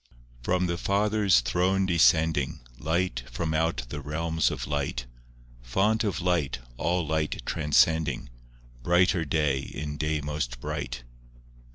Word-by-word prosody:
I - - -29 0.3
From 90 0 +2
the 85 -1 -2
Father's 100 - +3
throne 90 +10 +1
descending, 80 -4 +3 0.2
Light 80 -4 0
from 80 +6 -2
out 80 -4 0
the 75 +2 -5
realms 80 +2 0
of - - -4
light; 70 -4 -2 0.6
Font 100 - +1
of 95 -6 -1
light, 85 -7 0 0.2
all 85 +6 0
light 80 0 -1
transcending, 75 -3 +2 0.5
Brighter 90 +3 +3
day 75 -3 +1
in 75 +2 -6
day 75 0 0
most 75 -5 -3
bright. - - -4
80 Hz, 130 wpm, -27 LUFS, 75-90 Hz, 0.6 s, Father's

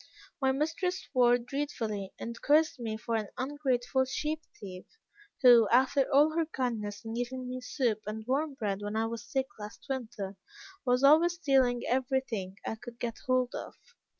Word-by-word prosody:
My 265 0 +3
mistress 325 +6 -1
swore 245 -3 +4
dreadfully, 235 -6 -3
and 230 0 -7
cursed 300 -1 +3
me 220 -2 -3
for 230 +1 -4
an 215 -2 -1
ungrateful 260 -1 0
sheep 300 +4 -2 0.2
thief, 185 -2 -9 0.6
who, 235 -4 +8
after 265 +4 +3
all 290 +3 +6
her 330 -1 +1
kindness 220 -7 -3
in 225 - -4
giving 250 +2 -3
me 255 0 -5
soup 245 -4 -1
and 215 +1 -5
warm 280 +3 0
bread 205 -5 -2
when 205 +1 -4
I 220 +1 +1
was 230 0 -4
sick 265 -1 0
last 210 +1 -9
winter, 220 -7 -4 0.5
was 250 +2 +3
always 320 +5 +6
stealing 265 -7 +2
every 265 +1 +1
thing 195 -7 -5
I 220 - -3
could 240 -1 -9
get 235 -1 -4
hold 255 -1 +2
of. - - -6
250 Hz, 170 wpm, -30 LUFS, 225-275 Hz, 0.6 s, who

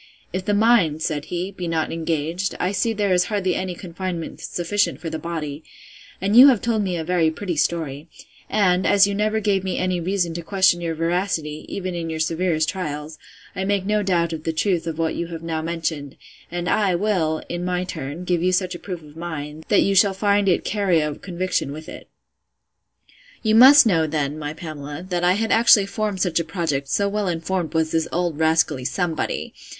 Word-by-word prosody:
If 185 0 -3
the 205 0 +1
mind, 205 -9 +3
said 150 -3 -2
he, 180 +2 -4
be 180 -3 -6
not 160 -1 -1
engaged, 165 +3 -2
I 180 - 0
see 205 +4 0
there 205 -3 0
is 180 0 +3
hardly 195 -4 -1
any 185 0 -3
confinement 175 -1 -6
sufficient 205 +4 -1
for 165 - -5
the 160 - -4
body; 155 -2 -5 0.6
and 200 +3 0
you 255 +4 +10
have 255 -6 +5
told 225 -1 0
me 185 -3 -1
a 160 - -3
very 170 -1 +2
pretty 175 +2 -4
story; 155 -2 -1 0.4
and, 185 -3 +2
as 200 0 +6
you 200 - -1
never 215 +2 0
gave 200 -3 +1
me 190 -1 -2
any 185 -1 0
reason 175 -1 -1
to 170 - -4
question 185 0 +2
your 165 -1 -2
veracity, 165 -2 -2
even 185 -2 -4
in 170 -1 -4
your 160 0 -4
severest 160 0 0
trials, 155 -4 -5 0.4
I 190 - -2
make 195 -1 0
no 210 +1 +1
doubt 170 -4 0
of 155 -1 -6
the 165 - -1
truth 170 0 0
of 160 -1 -3
what 165 -1 0
you 170 - -3
have 165 -1 -8
now 160 -1 -2
mentioned: 160 -4 -4 0.3
and 175 0 -4
I 195 -3 +2
will, 170 -5 0
in 175 0 -4
my 180 0 -1
turn, 155 -1 -6
give 180 -2 0
you 180 +1 +2
such 185 0 0
a 175 - -7
proof 180 -5 -7
of 150 0 -15
mine, 160 -2 -6
that 205 - +4
you 195 - +1
shall 195 0 +4
find 200 0 +2
it 175 - +1
carry 195 -5 +1
a 150 -1 -1
conviction 180 -3 -3
with 155 +2 -8
it. - - -10 1.4
You 215 -1 +2
must 265 +5 +9
know, 165 -7 +2
then, 150 -1 -2
my 150 0 -4
Pamela, 155 0 -7
that 175 -1 -1
I 180 +1 +4
had 225 +3 -1
actually 225 -3 +6
formed 200 -1 -3
such 175 -3 +1
a - - 0
project, 160 -5 -2
so 200 +8 +1
well 205 0 -1
informed 170 0 -2
was 160 -1 +1
this 160 0 0
old 170 -3 -1
rascally 160 -4 +2
Somebody! 170 +4 -2
175 Hz, 205 wpm, -22 LUFS, 160-195 Hz, 1.4 s, you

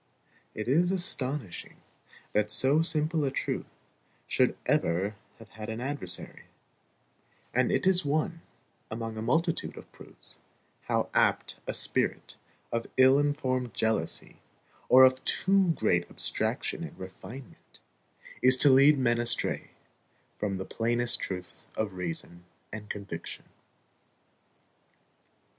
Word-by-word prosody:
It 110 - -5
is 170 +8 +3
astonishing 140 - -2 0.5
that 105 0 +1
so 130 +9 +4
simple 155 -1 +1
a 140 - +1
truth - - -3 0.6
should - - +1
ever 95 +6 0 0.2
have - - -15
had 110 +1 -9
an 110 +1 -4
adversary; 130 -8 -4 1.1
and 125 0 +2
it - - 0
is 185 -1 +4
one, 155 +3 -1 0.5
among 115 0 -5
a 110 - -5
multitude 160 +9 -1
of - - -12
proofs, - - -10 0.5
how - - -1
apt - - +1
a - - -2
spirit - - +1 0.4
of 115 0 -2
ill 130 +1 +6
informed 130 -4 -1
jealousy, 110 -8 +1 0.5
or 130 +1 +8
of 130 0 +4
too 195 0 +3
great 90 -5 +1
abstraction - - -2
and - - -9
refinement, 95 +7 -11 0.6
is 130 0 +7
to 140 +1 +6
lead 140 +3 +6
men 120 -3 +1
astray 120 0 -1 0.7
from 100 -2 -3
the 95 - -5
plainest 120 +1 +2
truths 90 -1 -5
of 110 -3 -2
reason 85 -1 -5 0.3
and 105 -1 -7
conviction. 100 -5 -7
120 Hz, 120 wpm, -28 LUFS, 105-145 Hz, 1.1 s, or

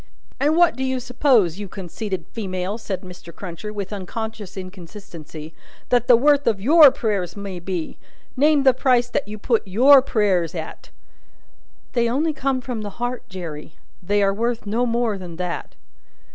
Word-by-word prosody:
"And 295 +4 +2
what 345 -8 +5
do 260 - -3
you 260 -1 -1
suppose, 240 - +2
you 205 - -5
conceited 190 0 -5
female," 190 -1 -4
said 195 -4 -4
Mr. 180 -2 -11
Cruncher, 180 +4 -7
with 205 -1 -5
unconscious 210 +1 -6
inconsistency, 170 -4 -10 0.4
"that 245 -1 +2
the 240 - +7
worth 285 +2 +3
of 220 -4 +2
your 295 +7 +8
prayers 205 -8 -2
may 195 -3 -6
be? 175 -2 -5 0.4
Name 290 +1 +3
the 265 -1 +6
price 245 -1 +2
that 275 - -1
you 210 +1 -7
put 225 +2 +1
your 260 +8 +7
prayers 195 - 0
at!" 160 -2 -7 1.0
"They 235 -2 +2
only 305 +6 0
come 270 -3 -1
from 245 -3 -5
the 205 -2 -7
heart, 245 +1 -4
Jerry. 165 -5 -8 0.3
They 205 +3 +1
are 195 0 +2
worth 230 +2 -2
no 230 +4 0
more 230 -3 0
than 175 -2 -8
that." 180 0 -5
210 Hz, 165 wpm, -22 LUFS, 185-250 Hz, 1.0 s, your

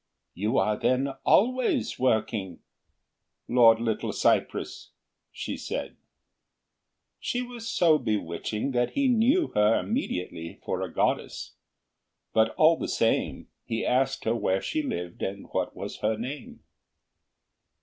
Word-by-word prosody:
"You 105 +7 -1
are 105 +2 +2
then 130 +2 +1 0.2
always 245 - +2
working, 110 -7 0 0.9
Lord 115 -2 +6
Little 115 -2 -1
cypress?" - - 0 0.4
she - - -5
said. - - -5 1.2
She 245 0 -2
was 240 -2 -7
so 160 -3 +4
bewitching 105 +4 -2
that 120 -1 0
he 280 -1 +2
knew 255 +8 +3
her 105 +1 +3
immediately 90 - -4
for - - -2
a - - -4
goddess; - - -1 0.8
but 110 0 +4
all 160 +1 +5
the - - -3
same 115 - 0
he 115 - -3
asked 135 +1 +1
her 115 - +1
where 95 -4 +1
she 310 - -2
lived 90 - -5
and 100 +1 -4
what - - -2
was - - -6
her 110 0 0
name. 130 +5 -7
120 Hz, 125 wpm, -27 LUFS, -, 1.2 s, Lord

